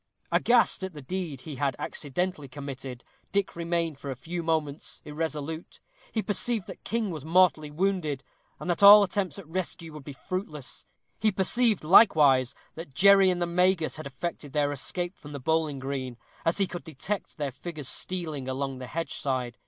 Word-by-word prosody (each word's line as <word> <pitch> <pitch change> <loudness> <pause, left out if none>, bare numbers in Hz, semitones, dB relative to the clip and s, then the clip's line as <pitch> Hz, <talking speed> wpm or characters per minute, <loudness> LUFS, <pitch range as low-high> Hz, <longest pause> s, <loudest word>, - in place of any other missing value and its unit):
Aghast 240 -5 +4
at 190 -1 -4
the 150 - -9
deed 165 -4 -4
he 150 -2 -7
had 135 -2 0
accidentally 150 +1 -3
committed, 135 -2 -7 0.3
Dick 200 -1 0
remained 170 -3 -1
for 140 - -6
a 135 - -3
few 170 +7 -5
moments 160 -3 -2
irresolute; 155 +1 -4 0.3
he 220 - -1
perceived 220 0 0
that - - -10
King 225 -3 -1
was 155 -5 -6
mortally 160 -2 +3
wounded, 155 -4 -1 0.4
and - - -7
that 175 +1 0
all 205 +1 +11
attempts 195 -1 -1
at 195 -6 -10
rescue 165 -1 -4
would 150 -2 -9
be 145 - -8
fruitless; 150 -3 -5 0.3
he 215 0 +3
perceived, 215 +2 +2
likewise, 150 - +6 0.2
that 160 -5 -9
Jerry 195 +1 +7
and 180 -1 +1
the 175 - +1
Magus 180 -1 +2
had 155 -2 -6
effected 145 +1 -5
their 145 -1 +2
escape 175 +6 -3
from 145 0 -10
the 140 - -5
bowling 160 0 0
green, 130 -2 -4 0.3
as 165 - +2
he 200 - +3
could 175 -1 -7
detect 180 +8 -5
their 145 -3 -2
figures 150 +1 -6
stealing 155 -8 -1
along 135 0 -3
the 125 - -7
hedge 165 +4 -3
side. 130 -4 -2
160 Hz, 175 wpm, -28 LUFS, 140-185 Hz, 0.4 s, all